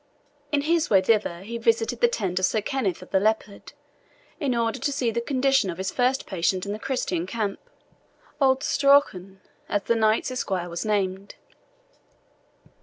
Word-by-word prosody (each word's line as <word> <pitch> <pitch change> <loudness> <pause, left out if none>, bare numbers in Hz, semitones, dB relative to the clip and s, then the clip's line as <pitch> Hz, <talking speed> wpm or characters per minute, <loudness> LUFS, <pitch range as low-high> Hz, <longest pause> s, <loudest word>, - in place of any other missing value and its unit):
In 290 -1 +2
his 330 +2 +1
way 195 - +6
thither 190 -3 +1
he 230 +4 -6
visited 230 +1 +1
the 240 - +6
tent 190 -6 -2
of 185 - +3
Sir 220 - 0
Kenneth 210 -6 -2
of - - -16
the 190 - +3
Leopard, 215 0 -2 0.7
in 270 -4 0
order 230 -1 -1
to 285 - -1
see 260 -4 0
the 235 +1 -2
condition 270 -4 +1
of 170 - -5
his 190 +1 -3
first 255 +1 0
patient 185 0 -1
in 200 - -4
the 210 - -4
Christian 185 -9 -2
camp, 210 -2 -3 0.8
old 265 -1 +3
Strauchan, 195 -10 +2 0.3
as 205 -1 0
the - - +1
knight's 220 +2 +1
esquire 190 -8 -3
was 170 0 -4
named. 195 -1 -1
220 Hz, 170 wpm, -25 LUFS, 190-255 Hz, 0.8 s, way